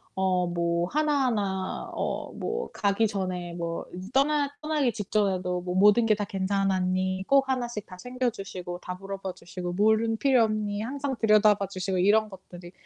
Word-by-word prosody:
어 185 -1 +1
뭐 170 0 0
하나하나 245 -11 0
어 - - -3
뭐 465 +1 -3
가기 205 +2 +2
전에 185 -3 -3
뭐 170 -1 -4 0.3
떠나 285 +1 +3
떠나기 305 -5 +1
직전에도 190 -4 -1
뭐 180 0 -4
모든 210 +4 +5
게 215 -1 +4
다 205 0 -3
괜찮았니, 190 -1 0
꼭 275 -1 +4
하나씩 240 -5 -2
다 185 - -11
챙겨주시고 195 -6 -4
다 180 0 -6
물어봐 195 -1 -5
주시고 175 +1 -6
물은 220 +3 +2
필요 260 -2 +4
없니 215 -1 -1
항상 270 +3 -3
들여다봐 210 -2 +4
주시고 185 0 -2
이런 215 +3 +4
것들이 180 -2 -12
200 Hz, 315 characters per minute, -27 LUFS, 185-230 Hz, 0.3 s, 모든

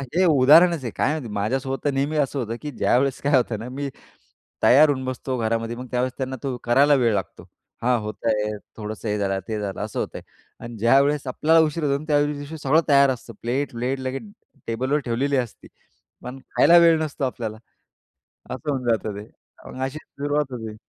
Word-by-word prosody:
हे 185 +1 +4
उदाहरणच 160 +2 +5
आहे. 120 - -4
काय - - +1
माहिती, 145 -7 -4
माझ्यासोबत 130 +6 -2
तर 145 - +3
नेहमी 140 +3 -1
असं 140 -1 0
होतं, 115 -1 -3
की 150 -1 -5
ज्यावेळेस 130 +1 +1
काय 145 0 +2
होतं 120 -4 -1
ना, 120 - -7
मी 140 +2 -4 0.7
तयार 145 +4 +7
होऊन 130 -2 -1
बसतो 130 0 -3
घरामध्ये, 115 0 -1
मग 125 +1 -8
त्यावेळेस 125 +1 0
त्यांना 130 -1 -3
तो 135 -3 -2
करायला 140 +5 +4
वेळ 115 -3 +3
लागतो. 95 -2 -4 0.4
"हां, 120 0 +2
होत 105 0 -7
आहे." 105 -1 0 0.2
थोडंसं 110 +1 -6
हे 105 - 0
झालं, 95 -1 -1
ते 110 -1 -3
झालं, 100 -2 -4
असं 105 0 -4
होतं - - -4
आहे - - -16
अन् 115 -1 -8
ज्यावेळेस 135 +5 +3
आपल्याला 160 +5 +3
उशीर 155 +1 -3
होतो, 140 0 0
त्या 145 -2 +2
दिवशी 145 +1 -5
सगळं 155 +3 +3
तयार 140 -2 +5
असतं, 125 -3 -5
प्लेट 130 +5 -2
प्लेट 125 +3 -2
लगेच 130 +4 -4 0.4
टेबलवर 130 +6 0
ठेवलेली 135 +4 0
असती. 120 -4 -4 0.6
पण 125 +2 -7 0.2
खायला 170 +4 +6
वेळ 170 -1 +6
नसतो 150 -2 -5
आपल्याला. 115 -4 -4 0.9
असं 130 +4 -5
होऊन 130 -2 -2
जातं 110 -2 0
ते. 105 +1 -9 0.4
मग 130 - -8
अशीच 135 +4 -4
सुरुवात 145 0 -3
होते. 110 -3 -6
130 Hz, 190 wpm, -23 LUFS, 115-145 Hz, 0.9 s, तयार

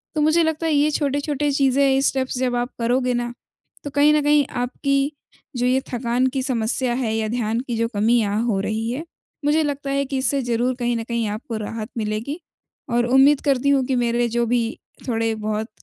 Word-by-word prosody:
तो 305 - +1
मुझे 315 +3 +4
लगता 320 0 -1
है 315 - +1
ये 295 +1 +3
छोटे-छोटे 290 0 0
चीज़ें, 275 0 +2
ये 270 0 +3
स्टेप्स 260 -2 0
जब 250 -1 0
आप 240 +1 -1
करोगे 250 +2 +1
ना, 240 0 -2 0.5
तो 285 - -4
कहीं 290 +2 +4
न 300 - +3
कहीं 295 -1 +4 0.2
आपकी 275 +3 0 0.5
जो 245 - 0
ये 260 +1 +2
थकान 245 +1 +1
की 265 - +1
समस्या 250 0 0
है 240 -4 -1
या 220 -1 -1
ध्यान 230 -1 -1
की 240 - -2
जो 230 0 +1
कमी 225 +4 +3
यहाँ 210 0 0
हो 215 -5 +1
रही 220 +2 -2
है, 270 +6 -4 0.4
मुझे 305 +2 +3
लगता 285 -1 -3
है 275 0 0
कि 270 0 -3
इससे 275 +1 +1
ज़रूर 245 +1 0
कहीं 240 0 0
न 225 - -3
कहीं 235 -1 -2
आपको 220 +2 -5
राहत 215 +1 -5
मिलेगी। 220 +8 -3 0.5
और 240 0 +2
उम्मीद 270 +3 +5
करती 275 -1 +2
हूँ 275 -2 +3
कि 265 - 0
मेरे 240 0 +1
जो 235 - +2
भी 240 0 +2 0.4
थोड़े-बहुत 220 -2 -1
250 Hz, 205 wpm, -22 LUFS, 230-280 Hz, 0.5 s, उम्मीद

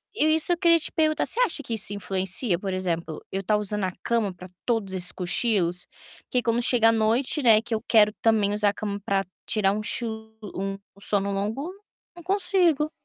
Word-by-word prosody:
eu 310 -7 +2
isso 315 0 +4
que - - +4
eu - - -2
queria 335 -1 +4
te - - -3
perguntar, 310 -1 +1
você - - 0
acha 330 -11 0
que 230 - -5
isso 215 -1 +1
influencia, 190 0 -1
por 195 -1 -4
exemplo, 170 -4 -3
eu 195 - -2
tá 210 +2 +1
usando 210 -1 -2
a 185 - -2
cama 230 -4 0
pra 180 +1 -12 0.2
todos 225 -5 -1
esses 180 -1 +1
cochilos? 180 -2 -1 0.4
Que 250 - 0
quando 230 +1 0
chega 235 -2 +3
a - - +5
noite, 230 +7 +1
né, 225 -4 +5
que 235 0 -6
eu 220 - -2
quero 210 -2 +4
também 215 -3 +2
usar 210 0 +2
a 200 - -3
cama 205 -1 -5
pra 195 -1 0 0.2
tirar 205 -3 +2
um 215 - -3
chu 235 - -3 0.5
um 195 +1 -3 0.2
sono 200 -1 0
longo, 215 - -3 0.4
não 345 - -12
consigo. 355 -5 +3
215 Hz, 205 wpm, -25 LUFS, 195-250 Hz, 0.5 s, a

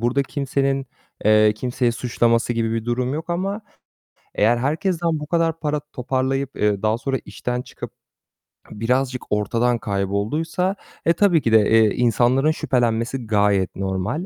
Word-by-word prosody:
burada 120 +4 +1
kimsenin, 135 0 -1 0.4
eee, 110 0 +5
kimseyi 120 +1 -1
suçlaması 115 0 +1
gibi 115 -1 -1
bir 115 -1 -2
durum 125 +3 -1
yok 160 +3 -5
ama 195 +5 -2 0.8
eğer 115 +3 +3
herkesten 165 - 0
bu 150 - -7
kadar 165 -1 0
para 150 -1 -1
toparlayıp, 135 -1 -2
eee, 105 -2 0
daha 110 +1 +1
sonra 135 +1 -2
işten 125 0 -4
çıkıp - - -9 0.8
birazcık 125 +4 -1
ortadan 115 +4 +1
kaybolduysa, 110 - -1 0.3
e, 170 - +4
tabii 175 -4 +3
ki 115 - 0
de, 110 -2 +5
eee, 110 -2 +5
insanların 125 +5 +3
şüphelenmesi 120 -2 -1
gayet 100 -3 +2
normal. 95 - -2
125 Hz, 140 wpm, -21 LUFS, 110-145 Hz, 0.8 s, eee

